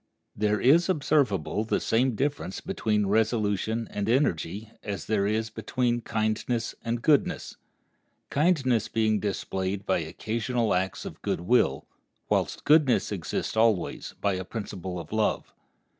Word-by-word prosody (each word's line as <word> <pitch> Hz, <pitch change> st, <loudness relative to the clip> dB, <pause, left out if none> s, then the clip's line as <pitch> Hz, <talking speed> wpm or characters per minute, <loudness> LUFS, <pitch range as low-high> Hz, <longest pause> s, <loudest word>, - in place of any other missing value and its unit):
There 105 Hz, 0 st, +1 dB
is 165 Hz, +8 st, +5 dB
observable 135 Hz, -, +1 dB
the 110 Hz, -, 0 dB
same 125 Hz, +1 st, +1 dB
difference 140 Hz, -6 st, -2 dB
between 110 Hz, -, 0 dB
resolution 110 Hz, +1 st, +1 dB
and 105 Hz, +1 st, -2 dB
energy 110 Hz, -, 0 dB
as 100 Hz, -5 st, -5 dB
there 100 Hz, -2 st, +1 dB
is 110 Hz, +1 st, -1 dB
between 120 Hz, -1 st, -1 dB
kindness 110 Hz, +1 st, -1 dB
and 115 Hz, 0 st, -2 dB
goodness—kindness 140 Hz, -, 0 dB
being 110 Hz, -2 st, +1 dB
displayed 95 Hz, -1 st, -3 dB
by 95 Hz, -, +2 dB
occasional 110 Hz, +7 st, -1 dB
acts 95 Hz, +1 st, -1 dB
of -, -, -8 dB
good -, -, -2 dB
will, 90 Hz, -, +2 dB, 0.4 s
whilst -, -, 0 dB
goodness 145 Hz, -8 st, +4 dB
exists 95 Hz, +1 st, -3 dB
always, 110 Hz, -5 st, +1 dB
by 100 Hz, -, +1 dB
a 95 Hz, 0 st, -3 dB
principle 95 Hz, -3 st, -5 dB
of 85 Hz, -1 st, -9 dB
love. 110 Hz, 0 st, 0 dB
110 Hz, 130 wpm, -27 LUFS, 100-120 Hz, 0.4 s, is